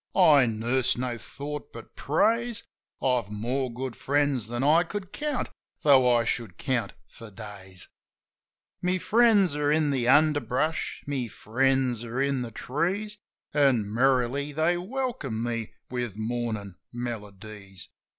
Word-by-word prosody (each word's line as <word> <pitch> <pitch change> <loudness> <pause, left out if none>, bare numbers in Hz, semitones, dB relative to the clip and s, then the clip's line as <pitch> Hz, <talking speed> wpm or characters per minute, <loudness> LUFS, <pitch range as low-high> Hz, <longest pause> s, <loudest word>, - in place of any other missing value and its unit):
Mornin'! 135 - +5
I - - -6
nurse 130 0 +2
no 125 -1 -2
thought 145 +6 -7
but 115 -1 -12
praise, 230 +9 +1 0.4
I've 125 -6 +1
more 120 +5 -2
good 125 +1 -5
friends 140 -5 +1
than 120 +2 -2
I 155 +4 +5
could 190 +2 -6
count, 295 -3 -2 0.3
tho' 130 -4 +6
I 115 - +1
should 115 -5 -3
count 125 -7 -1
for 115 - -12
days. 95 -3 -9 0.9
My 180 +1 +1
friends 210 -5 +4
are 145 0 +1
in 155 -1 +2
the 125 -3 0
underbrush, 150 +1 +2
my 135 -4 -2
friends 125 +2 0
are 120 +2 -4
in 140 -1 +1
the 120 - -4
trees. 185 - -2 0.3
An' 125 -8 +2
merrily 130 +3 +2
they 160 +4 +2
welcome 180 - -3
me 115 -2 -3 0.2
with 120 -5 -3
mornin' 110 -4 -3
melodies. 105 -4 -7
130 Hz, 135 wpm, -27 LUFS, 115-150 Hz, 0.9 s, tho